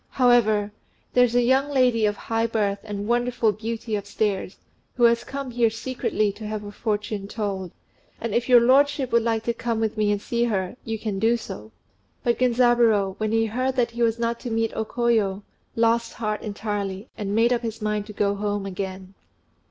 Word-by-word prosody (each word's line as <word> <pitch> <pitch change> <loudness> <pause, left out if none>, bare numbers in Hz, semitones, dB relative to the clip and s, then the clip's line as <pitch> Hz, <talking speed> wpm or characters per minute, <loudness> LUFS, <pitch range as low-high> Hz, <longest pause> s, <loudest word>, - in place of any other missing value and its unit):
However, 220 -5 +3 0.4
there's 245 -1 +4
a 245 - +4
young 265 +3 +3
lady 250 -5 +3
of 205 -1 -2
high 225 0 -1
birth 205 -3 0
and 205 -1 -5
wonderful 240 -1 +1
beauty 220 +1 -4
upstairs, 200 -1 -2 0.4
who 245 - 0
has 235 0 +5
come 275 -2 -5
here 235 -1 +3
secretly 225 -2 -1
to 215 +2 -8
have 215 0 -4
her 205 - -7
fortune 205 -2 -3
told; 200 -4 -3 0.5
and 230 -2 -3
if 240 +1 0
your 245 -1 +8
lordship 275 +2 +3
would 235 - +4
like 225 -1 0
to 235 - 0
come 230 -1 -2
with 220 0 -1
me 210 -1 +2
and 205 - 0
see 235 +3 -1
her, 195 -3 -2
you 225 0 -3
can 210 -3 -3
do 230 +3 +3
so." 110 - -9 0.5
But 240 -1 +1
Genzaburô, 240 -5 +3
when 215 0 -1
he 225 0 +2
heard 255 +4 -1
that 240 -2 +1
he 235 +1 -5
was 230 -1 +2
not 235 0 -1
to 245 - -6
meet 225 0 0
O 220 - -2
Koyo, 215 -5 0 0.3
lost 230 0 +2
heart 215 -2 -3
entirely, 205 -1 -4
and 205 -1 -3
made 235 +2 +4
up 240 - 0
his 225 -2 -5
mind 210 -1 -2
to 210 - -8
go 200 0 +1
home 205 0 -2
again. 190 0 -6
225 Hz, 195 wpm, -24 LUFS, 205-235 Hz, 0.5 s, your